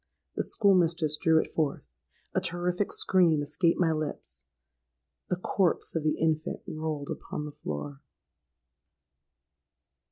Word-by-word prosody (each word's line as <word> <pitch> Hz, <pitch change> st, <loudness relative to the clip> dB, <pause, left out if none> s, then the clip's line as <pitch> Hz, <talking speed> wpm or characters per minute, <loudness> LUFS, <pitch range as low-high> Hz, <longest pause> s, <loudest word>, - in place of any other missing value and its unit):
The -, -, 0 dB
school 200 Hz, -2 st, +4 dB
mistress 165 Hz, -4 st, +3 dB
drew 160 Hz, +1 st, +3 dB
it -, -, -3 dB
forth—a 70 Hz, -, -4 dB
terrific 180 Hz, +3 st, -1 dB
scream 170 Hz, -6 st, +3 dB
escaped 165 Hz, +4 st, +1 dB
my 170 Hz, -3 st, +3 dB
lips—the 155 Hz, -1 st, -4 dB, 0.9 s
corpse 180 Hz, -1 st, 0 dB
of 165 Hz, -, +1 dB
the 155 Hz, 0 st, 0 dB
infant 160 Hz, -1 st, 0 dB
rolled 155 Hz, -2 st, -4 dB
upon 150 Hz, -, -5 dB
the 150 Hz, -, -6 dB
floor! 75 Hz, -, -6 dB
160 Hz, 115 wpm, -28 LUFS, 150-175 Hz, 0.9 s, school